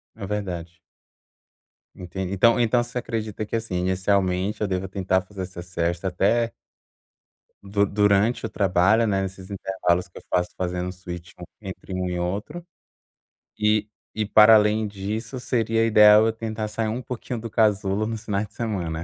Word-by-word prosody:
É 105 Hz, -, -7 dB
verdade. 90 Hz, -4 st, -4 dB, 1.2 s
Entendi. 90 Hz, +1 st, -5 dB
Então 115 Hz, +5 st, +4 dB
então 120 Hz, +1 st, +3 dB
você 120 Hz, +1 st, -7 dB
acredita 110 Hz, -2 st, -4 dB
que, 110 Hz, -, -4 dB
assim, 110 Hz, -5 st, -3 dB
inicialmente, 95 Hz, +2 st, 0 dB
eu 105 Hz, -, +1 dB
deva 95 Hz, 0 st, -2 dB
tentar 95 Hz, 0 st, 0 dB
fazer 95 Hz, +1 st, -9 dB
essa 90 Hz, -1 st, -7 dB
sesta 85 Hz, +1 st, -2 dB
até 115 Hz, +6 st, +1 dB, 1.1 s
du 100 Hz, +1 st, +1 dB
durante 105 Hz, +3 st, +2 dB
o -, -, -3 dB
trabalho, 100 Hz, +4 st, +3 dB
né, 100 Hz, -2 st, +1 dB
nesses 95 Hz, 0 st, -7 dB
intervalos 95 Hz, -2 st, -1 dB
que 90 Hz, -, -15 dB
eu -, -, -20 dB
faço 90 Hz, 0 st, 0 dB
fazendo 90 Hz, 0 st, -3 dB
switch 90 Hz, -1 st, -9 dB
um -, -, -8 dB, 0.2 s
entre 95 Hz, -1 st, -8 dB
um 90 Hz, 0 st, -2 dB
e 90 Hz, 0 st, -3 dB
outro. 105 Hz, -, -4 dB, 0.9 s
E 105 Hz, 0 st, +2 dB, 0.3 s
e, 110 Hz, -1 st, -1 dB
para 110 Hz, +2 st, +7 dB
além 105 Hz, +1 st, +3 dB
disso, 105 Hz, +5 st, -5 dB
seria 115 Hz, -2 st, +1 dB
ideal 105 Hz, 0 st, +7 dB
eu 115 Hz, -, +1 dB
tentar 110 Hz, -1 st, -4 dB
sair 110 Hz, +1 st, -2 dB
um 120 Hz, +3 st, -3 dB
pouquinho 125 Hz, -1 st, -5 dB
do 115 Hz, -, -6 dB
casulo 105 Hz, -1 st, +1 dB
nos 110 Hz, -1 st, -5 dB
finais 100 Hz, 0 st, -1 dB
de 105 Hz, -, -20 dB
semana. 90 Hz, -9 st, -3 dB
100 Hz, 165 wpm, -24 LUFS, 90-110 Hz, 1.2 s, para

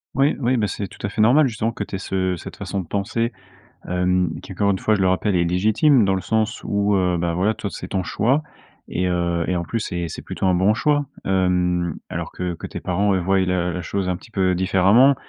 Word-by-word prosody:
Oui, 140 Hz, +4 st, +3 dB
oui, 125 Hz, -1 st, +1 dB
bah, 105 Hz, -2 st, +1 dB
c'est 100 Hz, 0 st, -4 dB
tout -, -, -14 dB
à -, -, -4 dB
fait 105 Hz, -, -1 dB
normal 135 Hz, +7 st, +5 dB
justement 115 Hz, -1 st, -2 dB
que 110 Hz, -, -4 dB
tu 100 Hz, -, -6 dB
aies -, -, -1 dB
ce 95 Hz, -1 st, -1 dB
cette 85 Hz, -, -9 dB
façon 100 Hz, -, -4 dB
de -, -, -9 dB
penser, 115 Hz, +5 st, -1 dB, 0.5 s
hem, 90 Hz, -2 st, +1 dB
qui, -, -, -11 dB
encore 100 Hz, +2 st, +1 dB
une 95 Hz, -, 0 dB
fois, 110 Hz, -, +2 dB
je 100 Hz, -, +1 dB
le 95 Hz, -, +3 dB
rappelle 95 Hz, +1 st, +1 dB
est 85 Hz, -, +2 dB
légitime, 110 Hz, -, +3 dB
dans 95 Hz, -1 st, +2 dB
le 95 Hz, -, -2 dB
sens 110 Hz, +3 st, -1 dB
où, 100 Hz, 0 st, +1 dB
heu, 90 Hz, -1 st, +1 dB
bah, 85 Hz, 0 st, -1 dB
voilà, 95 Hz, +6 st, +1 dB
toi 100 Hz, -, -5 dB
c'est -, -, -7 dB
ton 95 Hz, -2 st, -1 dB
choix 130 Hz, -, +1 dB, 0.5 s
et 90 Hz, +1 st, -1 dB
heu 85 Hz, -1 st, 0 dB
et 90 Hz, -, 0 dB
en 85 Hz, -, -2 dB
plus 115 Hz, +6 st, -3 dB
c'est 85 Hz, -4 st, -3 dB
c'est -, -, -7 dB
plutôt -, -, -4 dB
un 90 Hz, -, +3 dB
bon 95 Hz, +4 st, +3 dB
choix. 145 Hz, +4 st, +1 dB, 0.2 s
Hem, 90 Hz, -3 st, +1 dB
alors -, -, -5 dB
que 90 Hz, -1 st, -3 dB
que -, -, -7 dB
tes -, -, -7 dB
parents, 100 Hz, +3 st, +1 dB
heu, 95 Hz, -, 0 dB
voient 95 Hz, +2 st, +2 dB
la 90 Hz, -1 st, 0 dB
la 90 Hz, +1 st, -4 dB
chose 95 Hz, +2 st, -2 dB
un 90 Hz, -, -1 dB
petit 115 Hz, -, -17 dB
peu 95 Hz, -2 st, +1 dB
différemment, 95 Hz, +9 st, +4 dB
95 Hz, 250 wpm, -22 LUFS, 90-110 Hz, 0.5 s, normal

